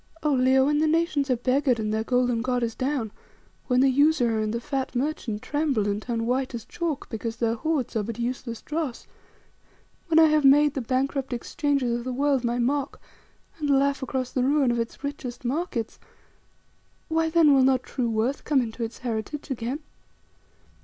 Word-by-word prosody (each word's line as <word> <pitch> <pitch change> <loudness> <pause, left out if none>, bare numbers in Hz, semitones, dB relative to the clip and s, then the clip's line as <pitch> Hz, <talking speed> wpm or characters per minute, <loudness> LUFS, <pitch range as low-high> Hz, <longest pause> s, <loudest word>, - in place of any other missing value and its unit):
Oh! 300 -2 +2
Leo, 260 0 +4
when 295 +1 +2
the 310 - +2
nations 310 -3 +1
are 255 - +3
beggared 255 0 +1
and 215 -1 -1
their 220 0 0
golden 245 -1 +1
god 250 0 0
is 230 -1 -1
down; 260 -4 -2 0.6
when 250 -1 +3
the 270 - +5
usurer 265 -4 +3
and 215 0 -1
the 235 - -2
fat 265 0 -3
merchant 245 -5 -2
tremble 290 -8 0
and 205 +1 -1
turn 230 -1 -2
white 255 +1 -1
as 230 - -7
chalk 335 -5 -3
because 225 0 -4
their 230 -1 0
hoards 275 +1 -2
are 220 - +2
but 220 +2 -5
useless 240 -1 -4
dross; 300 -5 -4 1.0
when 325 -2 +2
I 325 - +8
have 305 -1 +3
made 290 +1 +6
the 270 - -2
bankrupt 265 +2 -1
Exchanges 255 0 -1
of 240 - -4
the 255 0 -3
world 275 -1 +1
my 240 0 0
mock, 270 +3 -1 0.6
and 295 -1 -2
laugh 280 +1 +2
across 260 -1 -3
the 255 - 0
ruin 275 -1 +3
of 240 - -1
its 230 +4 -5
richest 265 -4 -6
markets, 260 -4 -2 1.1
why, 320 0 +1
then, 320 -3 +5
will 270 - +5
not 260 -1 +3
true 245 -3 -2
worth 225 +5 -1
come 260 -6 +1
to 230 +1 -5
its 225 0 -5
heritage 245 +5 -4
again? 255 +4 -3
260 Hz, 185 wpm, -25 LUFS, 235-285 Hz, 1.1 s, I